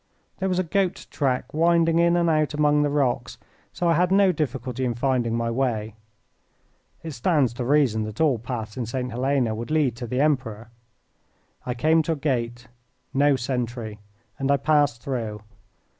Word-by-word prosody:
There 190 -1 0
was 180 - 0
a 185 - +2
goat 185 +2 -1
track 130 -4 -1
winding 165 +1 +3
in 170 0 +4
and 170 -1 +2
out 155 -2 +1
among 150 0 +3
the 145 - +1
rocks, 140 -4 -1 0.3
so 175 - -2
I 170 - +4
had 180 +3 +2
no 195 -1 +5
difficulty 130 -5 -3
in 120 -2 -1
finding 120 -2 0
my 115 0 -1
way. 115 -4 -1 1.1
It 165 - -5
stands 135 -1 +1
to 120 0 -4
reason 135 -5 +2
that 110 0 -8
all 145 -7 +3
paths 115 -2 -5
in 120 -3 -3
St. 125 +1 -3
Helena 125 -1 0
would 115 +4 -5
lead 150 -6 +1
to 120 -1 -5
the 125 +3 -2
Emperor. 125 -7 0 1.0
I 125 - -2
came 160 +6 +3
to 160 +1 -1
a - - -3
gate. 120 -4 -2 0.5
No 145 +1 +4
sentry 120 -4 -3 0.4
and 135 0 -1
I 140 - +4
passed 140 -4 +1
through. 110 -6 -4
135 Hz, 175 wpm, -24 LUFS, 120-155 Hz, 1.1 s, no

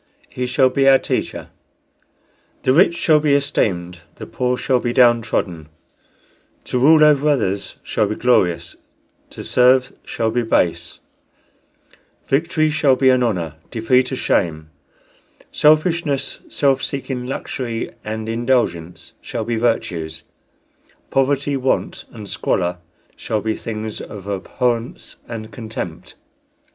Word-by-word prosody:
He 125 0 -3
shall 130 +1 +3
be 135 +1 +3
our 135 - +7
teacher. - - -3 1.1
The 130 - +3
rich 170 +2 +4
shall 155 -2 +4
be 150 -2 +2
esteemed, 90 -11 -1 0.2
the - - -8
poor 125 0 -1
shall 130 -1 +1
be 120 -1 -2
down 120 -2 +5
trodden; 85 -8 -3 0.9
to 125 - -2
rule 155 +4 +6
over 150 -1 +4
others 100 -8 -1
shall - - 0
be - - -3
glorious, 95 -9 +1 0.5
to - - -9
serve 125 +1 +3
shall 110 -1 -2
be 120 +2 0
base; 85 -7 0 1.3
victory 155 +2 +1
shall 150 -3 +3
be 130 0 +4
an 130 -1 +2
honor, 85 -10 -1
defeat 125 +3 +1
a - - -1
shame; 80 -9 -1 0.8
selfishness, 155 -1 +2
self 135 -2 +1
seeking, 130 -2 -4
luxury, 120 -3 -4
and 110 0 -5
indulgence 115 -8 -1
shall 115 -2 -4
be 120 +1 -1
virtues; 85 -9 -2 0.9
poverty, 140 +1 +1
want, 130 -1 -1
and 110 -3 -9
squalor 90 -1 -1 0.4
shall 110 - -2
be 110 +1 -1
things 110 -1 -5
of 100 -3 -9
abhorrence 115 +4 -3
and 110 -1 -7
contempt." 105 -6 -7
120 Hz, 125 wpm, -20 LUFS, 105-135 Hz, 1.3 s, our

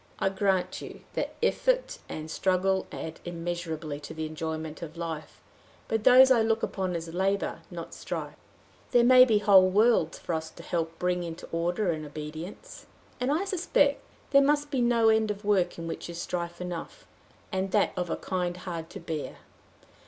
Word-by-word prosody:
I 195 - +1
grant 190 -1 0
you - - -9
that - - -3
effort - - +1
and 155 0 -6
struggle 190 +1 +1
add 160 0 -6
immeasurably 165 -3 -4
to 145 - -9
the 160 0 -3
enjoyment 160 0 -5
of 165 0 -8
life, 165 -2 -6 0.5
but 225 -1 -1
those 260 +1 +8
I 240 -3 +6
look 225 0 +1
upon 185 -2 -2
as 165 0 -5
labor, 195 +2 0
not - - -7
strife. - - -5 0.6
There 240 - +5
may 255 +1 +8
be 220 -4 +3
whole 195 -3 +6
worlds 205 -4 +3
for 175 - -4
us 160 0 -2
to - - -13
help 165 -1 -2
bring 180 0 0
into 170 0 -6
order 175 +3 0
and 155 -1 -4
obedience. 155 - -8 0.3
And 250 +2 0
I 330 +7 +1
suspect 335 -7 +2 0.3
there 275 -1 +7
must 290 +1 +2
be 265 -4 +1
no 235 -2 +4
end 220 -1 +3
of 205 0 -4
work 200 -4 +2
in 165 - -6
which 165 - -5
is 170 0 -6
strife 170 -1 -4
enough 180 - -6 0.5
and 190 0 -1
that 205 +2 +2
of 180 -2 -2
a - - 0
kind 180 -2 -2
hard 170 -3 -6
to - - -8
bear. 155 -3 -5
180 Hz, 180 wpm, -28 LUFS, 165-220 Hz, 0.6 s, those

